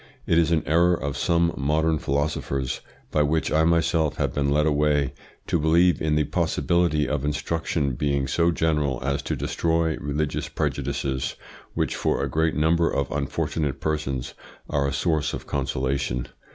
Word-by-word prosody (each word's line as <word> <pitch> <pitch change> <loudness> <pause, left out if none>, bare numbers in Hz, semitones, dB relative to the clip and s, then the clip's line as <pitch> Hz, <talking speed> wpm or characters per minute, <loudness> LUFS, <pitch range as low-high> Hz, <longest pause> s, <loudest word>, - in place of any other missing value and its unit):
IT - - +2
IS 80 -1 +3
AN 80 -2 +2
ERROR 85 +4 +4
OF 70 -3 -4
SOME 85 +3 +2
MODERN 80 +2 +1
PHILOSOPHERS, 70 -2 -2 0.3
BY 75 - +2
WHICH 75 +2 +1
I 80 +1 +3
MYSELF 80 -2 +2
HAVE - - -1
BEEN 70 -1 0
LED 75 +1 +3
AWAY, 75 -3 +2 0.3
to 85 - 0
believe 85 +3 +3
in 75 -1 +1
the 75 - +3
possibility 85 0 +1
of 75 -2 -1
instruction 75 0 -1
being 70 +2 0
so 85 +6 +2
general 75 -6 0
as 70 +1 -1
to - - -2
destroy 80 -1 0
religious 75 +1 -2
prejudices, 70 -1 -2 0.4
which - - 0
for - - 0
a - - 0
great 80 0 +1
number 80 +2 +3
of 70 -1 -1
unfortunate 70 0 -2
persons 75 -5 -2 0.3
are 70 -1 0
a - - -1
source 80 -1 0
of - - -8
consolation. 65 -2 -1
75 Hz, 160 wpm, -24 LUFS, 70-80 Hz, 0.4 s, ERROR